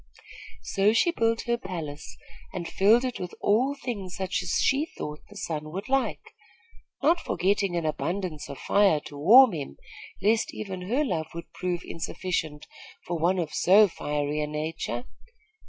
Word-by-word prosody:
So 200 +2 +2
she 340 +9 +3
built 230 -7 +1
her 235 0 -1
palace 155 -7 -7 0.4
and 175 -2 -4
filled 215 +8 +4
it 255 - -3
with 180 -1 -6
all 255 +7 +2
things 210 -9 -5
such 185 -3 -2
as 180 - -2
she 285 +4 +2
thought 150 - -7
the 205 - -14
sun 155 -5 -4
would 195 +5 -5
like, 270 0 -1 0.7
not 335 +4 +4
forgetting 195 - 0
an 170 -2 -1
abundance 155 0 -3
of 140 - -7
fire 195 -3 +3
to 145 - -11
warm 225 - +8
him, 140 - -6 0.4
lest 215 +3 +1
even 190 -3 -6
her 280 +6 +2
love 160 - -2
would 170 0 -8
prove 180 -1 -3
insufficient 160 -3 -3 0.4
for 175 -1 -3
one 175 +4 +2
of 165 -4 -2
so 205 +4 +6
fiery 150 -3 -2
a 150 - -1
nature. 150 -5 -3
185 Hz, 160 wpm, -27 LUFS, 155-215 Hz, 0.7 s, warm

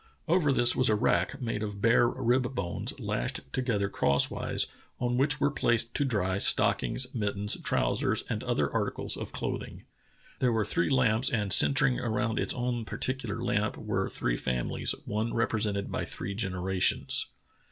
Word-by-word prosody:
Over 165 -3 +2
this 120 -2 +4
was 130 -2 +4
a 110 - +3
rack, 105 - 0
made 115 -3 -3
of 105 -2 -5
bear 115 +2 +4
rib 125 +1 0
bones 90 -6 -4
lashed - - -3
together 115 -6 0
crosswise, 70 -7 +1 0.3
on 120 0 -1
which 145 +3 +1
were 145 - +2
placed 120 -4 +1
to 145 - 0
dry 100 -7 -1
stockings, 115 - +3
mittens, 105 -2 -1
trousers, - - 0
and - - -3
other - - -1
articles - - -2
of - - -6
clothing. - - -5 0.6
There 125 - +2
w^re 110 -2 0
three 170 - 0
lamps, 125 -2 +3
and 105 -4 +2
centring 135 +2 +4
around 115 -1 -1
its - - -1
own 120 -1 -2
particular 120 -1 -3
lamp 105 -3 -1
were 95 -3 -2
three - - -2
families, 60 -2 -1
one 110 +2 -2
represented 105 -3 -1
by - - -2
three 100 +3 -5
generations." 95 -2 +1
115 Hz, 155 wpm, -28 LUFS, 100-125 Hz, 0.6 s, this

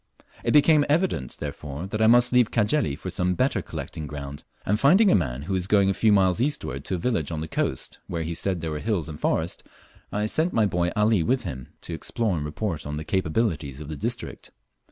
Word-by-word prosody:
It - - +1
became 150 0 +6
evident, 155 - 0
therefore, 75 +2 -5
that 105 +3 -3
I 110 - +5
must 120 +2 +5
leave 125 -3 +5
Cajeli 110 - +1
for - - -6
some 90 0 0
better 125 -4 +1
collecting 80 -1 -6
ground, 70 -1 -7 0.2
and 105 +2 +1
finding 185 - +5
a - - +5
man 70 -7 -1
who 95 +6 -3
was 95 -1 -1
going 100 -1 +4
a - - 0
few 110 +3 +3
miles 95 0 +3
eastward 70 - -1
to 95 - -2
a - - -2
village 85 - -1
on 80 - -3
the 80 - -4
coast - - -2
where 85 -2 -3
he 80 +1 -3
said 90 +1 0
there 80 -1 -3
were 75 - -3
hills 100 -4 -1
and 75 -2 -7
forest, 80 +2 0 0.5
I 105 +1 -1
sent 160 +10 0
my 110 - +3
boy 90 -3 0
Ali 105 -2 +3
with 125 +10 +1
him 65 -2 -6
to 85 - -5
explore 110 +4 -1
and 75 - -2
report 75 0 -3
on 75 0 -4
the 75 - -5
capabilities 80 - -1
of 75 -1 -8
the 80 - -4
district. 70 - -5
95 Hz, 225 wpm, -25 LUFS, 75-110 Hz, 0.5 s, became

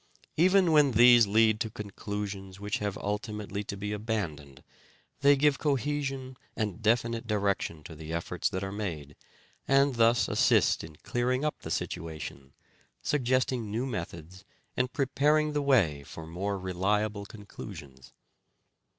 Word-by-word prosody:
Even 185 +1 +4
when 145 -4 +5
these 120 -1 +7
lead 110 +1 +4
to 110 - -1
conclusions 100 -2 -6
which 105 0 -2
have 105 -2 -3
ultimately 105 -1 -4
to 100 - -6
be 105 +1 -4
abandoned 85 - -4 0.6
they 140 +1 +6
give 140 0 +2
cohesion 140 -2 -1 0.2
and 110 -1 -3
definite 115 +1 +1
direction 100 -7 -1
to 80 - -9
the 80 +1 -8
efforts 85 +1 -2
that 95 +1 -3
are 95 - -4
made, 80 -9 -5 0.5
and 135 -1 +3
thus 115 +1 +4
assist - - +3
in 80 -1 -10
clearing 125 +3 0
up 150 - -2
the - - -8
situation, 75 -5 -5 0.5
suggesting 130 -4 0
new 115 +5 -2
methods, 90 - -6 0.3
and 125 0 0
preparing 150 +2 +2
the 145 - 0
way 105 - +3
for 80 +3 -10
more 95 +5 -3
reliable 100 +3 -1
conclusions. 75 -11 -11
105 Hz, 135 wpm, -29 LUFS, 95-130 Hz, 0.6 s, these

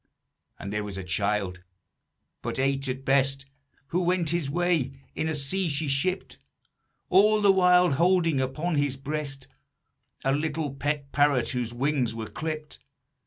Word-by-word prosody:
"And 100 +1 -6
there 105 0 -1
was 100 -2 -6
a 95 - -4
child, 95 0 -1 0.8
but - - -3
eight 135 +1 0
at 130 +1 -4
best, 135 0 +2 0.4
Who 180 - 0
went 175 -3 +1
his 170 -5 -1
way 165 -4 +1 0.2
in 160 - -2
a 160 - -1
sea 165 +6 -1
she 145 +1 -1
shipped, 180 +8 -1 0.7
All 210 +3 +5
the 205 -1 +6
while 180 -2 +5
holding 165 -1 +3
upon 150 +5 -1
his 145 -2 0
breast 140 -1 -5 0.8
A 135 - +2
little 150 0 -1
pet 140 0 -2
parrot 145 -4 +3
whose 125 -2 -2
wings 125 -2 0
were 110 -1 -4
clipped. 155 +4 -6
145 Hz, 150 wpm, -27 LUFS, 130-165 Hz, 0.8 s, the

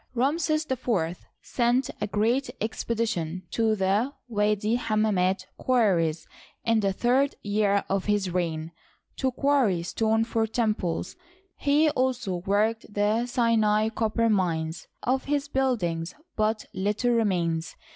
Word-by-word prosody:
Ramses 310 +4 +1
IV 215 - -1 0.2
sent 245 +1 +1
a 210 - 0
great 230 +6 +1
expedition 215 -6 -2
to 225 -1 +2
the 200 +6 +1 0.2
Widi 210 +1 +1
Hamma 215 -2 +1
mit 185 0 +1
quarries, 180 -11 +2 0.4
in 230 -1 +3
the 200 -2 +1
third 255 +7 +1
year 205 -1 +1
of 195 -1 -1
his 205 -3 0
reign, 165 -2 -2 0.5
to 260 -1 0
quarry 250 -10 +2
stone 220 +5 +1
for 225 -1 0
temples. 215 -7 -1 0.4
He 295 +2 +3
also 250 -8 -1
worked 210 +5 0
the 210 +4 +1
Sinai 220 -3 +2
copper 230 +1 0
mines. 165 -6 0 0.2
Of 260 +2 0
his 285 0 0
buildings 200 - -1 0.2
but 215 0 0
little 210 +5 0
remains. 175 -8 0
215 Hz, 125 wpm, -26 LUFS, 190-240 Hz, 0.5 s, in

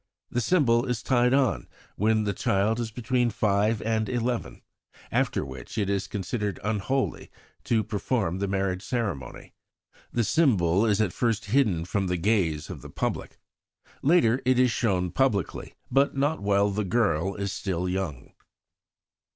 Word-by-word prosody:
The 120 - 0
symbol 120 -4 +3
is 125 -4 -2
tied 125 -1 +3
on 130 - +1 0.3
when 110 +1 +2
the 100 -1 -1
child 100 +5 +1
is 115 -2 -2
between 120 +2 0
five 105 0 +1
and 110 -1 0
eleven, 120 - -2 0.5
after - - 0
which 65 - -9
it 100 -2 0
is 100 0 -1
considered 105 0 -3
unholy 110 +6 -1 0.4
to 110 -2 +2
perform 105 -4 -1
the 100 - -1
marriage 95 -1 -1
ceremony. 100 - -4 0.6
The 120 - +1
symbol 105 - +3
is 105 0 +2
at 95 -5 0
first 115 -3 0
hidden 105 -12 +2
from 95 +1 -1
the 90 0 0
gaze 85 -6 +1
of - - -8
the - - -10
public. - - -3 0.6
Later 135 -6 +3
it 130 0 +3
is 125 -1 +4
shown 95 -6 0
publicly, 110 - -1 0.2
but 140 0 +2
not 145 +3 +1
while 100 0 +2
the 105 +2 -1
girl 100 -4 +1
is 100 -1 -3
still 90 -3 -2
young." 90 -8 -4
105 Hz, 150 wpm, -26 LUFS, 95-120 Hz, 0.6 s, is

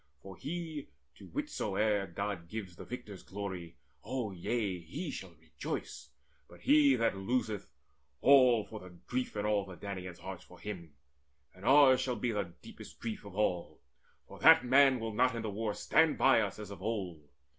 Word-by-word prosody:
For 95 -1 -9
he, 155 - -5 0.3
To - - -12
whichsoe'er 105 - -1
God 95 -1 -4
gives 100 -5 -6
the - - -10
victor's 115 -7 -8
glory 95 -4 -6 0.3
O 125 -5 -3
yea, 95 +1 -2
he 85 - -5
shall 95 -8 -8
rejoice! 80 0 -6 0.4
But - - -16
he 145 -2 +5
that 115 -4 +1
loseth 105 0 -1 0.5
All 130 -5 +6
for 110 - -8
the 95 - -11
grief 125 +9 -4
in 105 0 -2
all 105 -1 +2
the 95 -2 -10
Danaans' 95 -3 -6
hearts 95 0 -8
For - - -16
him! 85 -7 -7 0.6
And 95 +1 -13
ours 135 -1 +7
shall 125 -2 -1
be 120 0 -1
the 100 -5 -2
deepest - - -12
grief 110 -3 -5
Of 100 -2 -10
all; 90 -5 0 0.5
for - - -12
that - - +7
man 135 0 +5
will 110 -1 -4
not 125 +3 +3
in 115 - -3
the 110 - -3
war 105 0 -2
Stand 155 +8 +3
by 135 -4 +5
us 100 -3 -3
as 105 -2 -8
of 100 - -9
old. 95 -9 -4
105 Hz, 175 wpm, -32 LUFS, 95-125 Hz, 0.6 s, ours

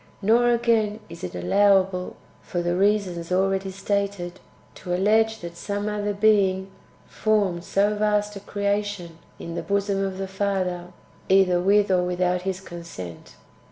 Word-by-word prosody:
Nor, 230 +4 +3
again, 230 -3 +2
is - - -11
it 90 - -5
allowable, 185 - +2 0.3
for 175 -1 -3
the 175 - 0
reasons^ 185 -2 0
already 195 +1 +1
stated, 195 -2 -2 0.3
to 180 0 -4
allege 220 +3 +2
that 170 0 -7
some 205 +4 -3
other 210 -1 -1
being 195 -2 +2 0.3
formed 200 -6 0
so 200 +3 +1
vast 210 0 0
a - - -6
creation 200 -4 -3 0.2
in 170 - -7
the 170 - -3
bosom 200 0 0
of 190 -1 -3
the 195 0 -3
Father, 190 -2 -2 0.4
either 190 -2 +4
with 200 +1 +3
or 180 -1 +3
without 180 0 0
His 190 0 -3
consent. 170 - -9
195 Hz, 145 wpm, -24 LUFS, 180-205 Hz, 0.4 s, either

